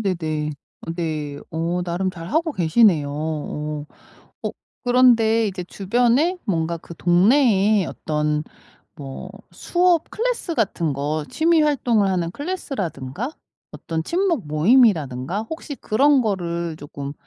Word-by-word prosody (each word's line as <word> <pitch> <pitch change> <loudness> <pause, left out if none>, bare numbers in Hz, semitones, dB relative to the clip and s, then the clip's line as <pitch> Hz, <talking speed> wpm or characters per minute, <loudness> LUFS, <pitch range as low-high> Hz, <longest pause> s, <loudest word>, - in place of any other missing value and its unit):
네네. 160 -6 -1 0.5
네. 155 -4 -3
어 170 +2 -1
나름 180 +2 -1
잘 170 -1 -9
하고 320 +1 +1
계시네요. 170 - +3
어. 150 -1 -4 0.6
어 - - 0 0.3
그런데 230 -3 +4
이제 185 -2 -4
주변에 245 - +1
뭔가 170 -4 -1
그 170 - -11
동네에 200 - +4
어떤 150 0 -1 0.5
뭐 140 +6 -8 0.2
수업 350 - +1
클래스 460 -7 -2
같은 170 - 0
거 145 +2 -2
취미 325 0 +3
활동을 240 -9 +2
하는 175 -3 0
클래스라든가 230 - -4 0.4
어떤 160 -1 -4
친목 340 - 0
모임이라든가 160 - +3
혹시 320 -2 -6
그런 270 +4 +3
거를 170 -6 -2
쪼끔 145 -2 -7
185 Hz, 245 characters per minute, -22 LUFS, 155-245 Hz, 0.6 s, 그런데